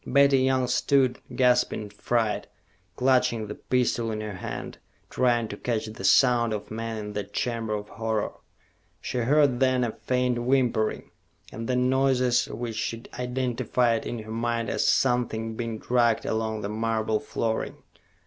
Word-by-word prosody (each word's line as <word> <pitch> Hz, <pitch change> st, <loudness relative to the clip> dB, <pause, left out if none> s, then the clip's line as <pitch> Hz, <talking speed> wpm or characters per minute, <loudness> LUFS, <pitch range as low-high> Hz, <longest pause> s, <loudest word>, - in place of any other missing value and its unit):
Betty 140 Hz, -1 st, +5 dB
Young 130 Hz, 0 st, +2 dB
stood, 130 Hz, 0 st, +2 dB, 0.2 s
gasping 125 Hz, -3 st, +2 dB
in 105 Hz, -, -9 dB
fright, 110 Hz, +1 st, -1 dB, 0.5 s
clutching 125 Hz, -3 st, +2 dB
the 105 Hz, -, -6 dB
pistol 120 Hz, -2 st, 0 dB
in 110 Hz, -, -3 dB
her 105 Hz, -1 st, -5 dB
hand, 95 Hz, -, -6 dB, 0.3 s
trying 120 Hz, -2 st, +2 dB
to 100 Hz, -, -6 dB
catch 115 Hz, -2 st, -2 dB
the 110 Hz, -3 st, -8 dB
sounds 120 Hz, +2 st, +4 dB
of 105 Hz, -, -8 dB
men 115 Hz, 0 st, -4 dB
in 105 Hz, -1 st, -6 dB
that 100 Hz, -1 st, -5 dB
chamber 115 Hz, -2 st, -1 dB
of 105 Hz, 0 st, -5 dB
horror. 110 Hz, -1 st, -2 dB, 0.7 s
She 125 Hz, -, -3 dB
heard, 135 Hz, +1 st, +3 dB
then, 130 Hz, -1 st, +3 dB
a 120 Hz, -, 0 dB
faint 125 Hz, +1 st, -1 dB
whimpering, 120 Hz, -3 st, 0 dB, 0.4 s
and 115 Hz, 0 st, -6 dB
then 125 Hz, 0 st, +2 dB
noises 130 Hz, -2 st, +2 dB
which 115 Hz, -1 st, -5 dB
she 115 Hz, +1 st, -3 dB, 0.2 s
identified 125 Hz, -2 st, 0 dB
in 120 Hz, -, -3 dB
her 110 Hz, -, -9 dB
mind 115 Hz, -1 st, -1 dB
as -, -, +1 dB
something 115 Hz, -3 st, +1 dB
being 115 Hz, -1 st, -3 dB
dragged 120 Hz, 0 st, +1 dB
along 110 Hz, -1 st, -1 dB
the 100 Hz, -, -3 dB
marble 110 Hz, 0 st, 0 dB
flooring. 110 Hz, +1 st, -3 dB
115 Hz, 155 wpm, -26 LUFS, 110-125 Hz, 0.7 s, Betty